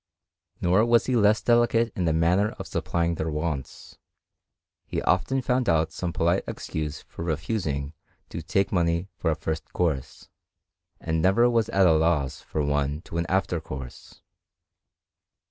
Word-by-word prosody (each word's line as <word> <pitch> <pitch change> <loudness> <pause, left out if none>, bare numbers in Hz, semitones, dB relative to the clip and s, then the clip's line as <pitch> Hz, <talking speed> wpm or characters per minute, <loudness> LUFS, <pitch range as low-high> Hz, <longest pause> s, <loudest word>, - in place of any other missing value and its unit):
Nor 90 +5 +4
was 120 0 +4
he 130 - 0
less 105 -1 +3
delicate 120 -1 +3
in 90 - -1
the 80 - +2
manner 90 +7 +2
of - - -6
supplying 85 0 -1
their 80 -1 -3
wants: 75 -3 -5 0.9
he - - -2
often 135 0 +1
found 125 0 +1
out 80 -1 +2
some 85 +1 -3
polite 85 +3 +1
excuse 75 -1 -5
for - - -9
refusing 80 -3 -2 0.4
to - - -5
take 95 0 0
money 85 0 0
for 80 - -1
a 80 - +1
first 80 0 -4
course, 80 -7 -2 0.7
and 80 0 -1
never 100 +8 +4
was 115 -3 +1
at 95 -1 +3
a 85 - +6
loss 80 -4 +1
for 75 - -3
one 75 +1 0
to 85 - -5
an 85 - -1
after 95 -2 +1
course. 65 -4 -9
85 Hz, 155 wpm, -26 LUFS, 80-100 Hz, 0.9 s, a